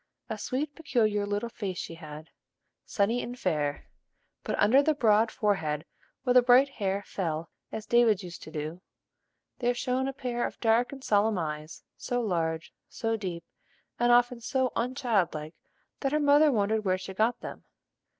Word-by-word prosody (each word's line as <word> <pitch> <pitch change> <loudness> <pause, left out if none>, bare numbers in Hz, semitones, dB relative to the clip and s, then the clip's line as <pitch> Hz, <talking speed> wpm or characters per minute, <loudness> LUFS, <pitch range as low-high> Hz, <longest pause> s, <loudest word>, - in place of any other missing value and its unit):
A 220 - -2
sweet, 280 +7 -2
peculiar, 215 -10 0
little 205 +3 -1
face 195 -5 -5
she 170 - -5
had, 155 -1 -10 0.6
sunny 225 +4 +1
and 245 +1 -6
fair; 150 -8 -1 0.6
but, - - -2
under 235 +7 +5
the 310 +1 +2
broad 220 -4 +4
forehead 160 -10 -1 0.4
where 250 - +2
the 250 - +8
bright 250 +3 +6
hair 200 -5 -2
fell 165 -3 -3 0.2
as 215 - -5
David's 225 -4 +4
used 175 -1 -9
to - - -9
do, 155 +3 -5 0.8
there 245 -1 +1
shone 255 +1 -1
a - - -1
pair 250 -3 -3
of - - -11
dark 230 +1 +2
and 270 -1 -9
solemn 210 -1 +2
eyes, 155 -1 -5
so 245 -1 -2
large, 165 -7 -1 0.2
so 225 0 -1
deep, 180 -6 -5 0.6
and 240 0 +4
often 245 0 +4
so 260 +1 0
unchildlike, 205 - 0 0.5
that 270 - -1
her 300 - +2
mother 290 +1 +5
wondered 215 -1 +1
where 185 -2 +1
she 190 +1 -7
got 220 +5 +1
them. - - -8
220 Hz, 165 wpm, -28 LUFS, 180-245 Hz, 0.8 s, the